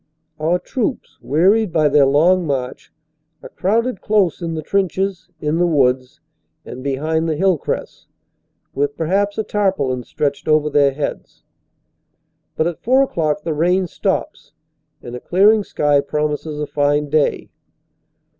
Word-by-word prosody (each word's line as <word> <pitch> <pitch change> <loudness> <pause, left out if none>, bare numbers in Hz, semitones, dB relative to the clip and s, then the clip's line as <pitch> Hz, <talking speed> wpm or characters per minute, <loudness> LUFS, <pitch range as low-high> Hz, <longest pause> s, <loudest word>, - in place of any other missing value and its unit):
Our 165 +3 +1
troops, 245 +7 -4
wearied 190 - +2
by 155 -2 +3
their 145 -1 +4
long 170 +5 +3
march, 130 -3 -4 0.5
are - - -9
crowded 225 +3 -1
close 200 -5 +1
in 165 -1 -3
the 155 - -4
trenches, 190 -1 -1
in 155 +2 -1
the 175 - +3
woods, 130 -5 +1 0.5
and 130 - -9
behind 155 +4 -1
the 155 - 0
hill 190 +3 +2
crests, - - -5 0.7
with 145 +1 -1
perhaps 200 +5 0
a 220 - 0
tarpaulin 185 -13 -1
stretched 140 +4 -3
over 155 -1 +2
their 140 -2 +3
heads. 145 +1 -6 1.1
But 160 - 0
at 170 -1 -3
four 260 +3 +3
o - - -1
clock 150 - -1
the 165 - -2
rain 180 +5 +1
stops 175 - -3 0.5
and 120 0 -7
a - - -6
clearing 205 - +3
sky 145 -6 +1
promises 150 +1 -3
a 150 - -1
fine 145 0 0
day. 155 -1 0
160 Hz, 145 wpm, -19 LUFS, 145-190 Hz, 1.1 s, their